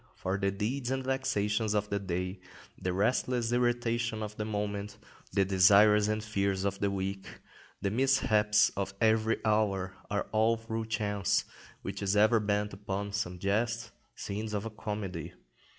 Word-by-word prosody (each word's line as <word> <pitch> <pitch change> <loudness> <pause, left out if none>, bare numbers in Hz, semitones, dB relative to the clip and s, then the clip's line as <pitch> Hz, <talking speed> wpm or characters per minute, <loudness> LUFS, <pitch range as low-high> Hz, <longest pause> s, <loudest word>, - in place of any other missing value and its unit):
For 95 +2 -2
the 100 0 +1
deeds 120 +6 -2
and 130 0 -1
vexations 110 -5 0
of 105 0 0
the 100 - +1
day, 90 0 -3 0.4
the 90 - -3
restless 115 +4 +1
irritation 120 -2 0
of 105 0 -6
the 105 - -3
moment, 105 -1 -3 0.3
the 100 0 +2
desires 100 +3 +6
and 110 0 -1
fears 100 -3 -1
of 100 0 -1
the 100 - +1
week, 95 0 -3 0.6
the 100 - +1
mishaps 110 -4 +3
of 100 0 -3
every 110 0 +3
hour, 100 -3 +1 0.2
are 100 - -1
all 110 +1 +3
through 115 0 -4
chance, 105 -3 0 0.4
which 100 +1 -5
is 100 +1 +1
ever 110 +2 +5
bent 105 0 -1
upon 100 +1 -4
some 90 -4 -2
jest, 115 +5 -1 0.2
scenes 105 +2 -4
of 105 +1 -2
a 115 - -4
comedy. 105 -6 -5
105 Hz, 155 wpm, -30 LUFS, 100-110 Hz, 0.6 s, desires